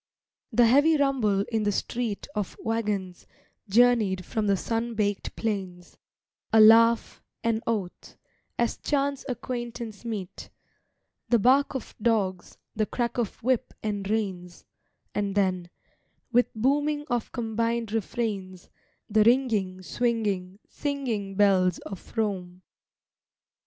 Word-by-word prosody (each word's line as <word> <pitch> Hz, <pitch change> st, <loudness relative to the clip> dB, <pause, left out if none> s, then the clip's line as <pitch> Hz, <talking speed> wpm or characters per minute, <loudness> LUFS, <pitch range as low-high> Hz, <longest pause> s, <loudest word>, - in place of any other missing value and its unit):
The 240 Hz, -, +5 dB
heavy 290 Hz, +7 st, +5 dB
rumble 255 Hz, -9 st, +2 dB
in 225 Hz, -1 st, +1 dB
the 205 Hz, -1 st, +1 dB
street 225 Hz, +1 st, -3 dB
Of 210 Hz, -3 st, -4 dB
waggons, 205 Hz, -5 st, -3 dB, 0.4 s
journeyed 215 Hz, -5 st, +3 dB
from 215 Hz, -2 st, -2 dB
the 200 Hz, -1 st, +3 dB
sun 230 Hz, +3 st, -2 dB
baked 205 Hz, -2 st, -1 dB
plains; 190 Hz, -5 st, -4 dB, 0.6 s
A 220 Hz, -, +5 dB
laugh, 230 Hz, +1 st, +6 dB, 0.2 s
an 230 Hz, -1 st, +1 dB
oath, 205 Hz, -6 st, -3 dB, 0.4 s
as 235 Hz, -1 st, 0 dB
chance 280 Hz, -1 st, -1 dB
acquaintance 240 Hz, -3 st, -5 dB
meet; 210 Hz, -6 st, -6 dB, 0.8 s
The 240 Hz, -, +5 dB
bark 265 Hz, +6 st, +3 dB
of 265 Hz, -, -5 dB
dogs, 200 Hz, -6 st, 0 dB, 0.2 s
the 215 Hz, -1 st, 0 dB
crack 240 Hz, 0 st, -2 dB
of 225 Hz, -3 st, -3 dB
whip 255 Hz, 0 st, 0 dB
and 205 Hz, -2 st, -3 dB
reins; 190 Hz, -5 st, -3 dB, 0.5 s
And 200 Hz, -1 st, -1 dB
then, 185 Hz, -3 st, 0 dB, 0.6 s
with 245 Hz, +1 st, +3 dB
booming 290 Hz, +5 st, +1 dB
of 240 Hz, -2 st, -1 dB
combined 230 Hz, -1 st, -1 dB
refrains, 200 Hz, -4 st, -3 dB, 0.4 s
The 215 Hz, 0 st, +4 dB
ringing, 215 Hz, -7 st, +2 dB
swinging, 205 Hz, -5 st, -1 dB
singing 240 Hz, -9 st, -3 dB
bells 190 Hz, -3 st, +3 dB
of 195 Hz, +4 st, -10 dB
Rome. 185 Hz, -4 st, -2 dB
220 Hz, 115 wpm, -27 LUFS, 195-240 Hz, 0.8 s, laugh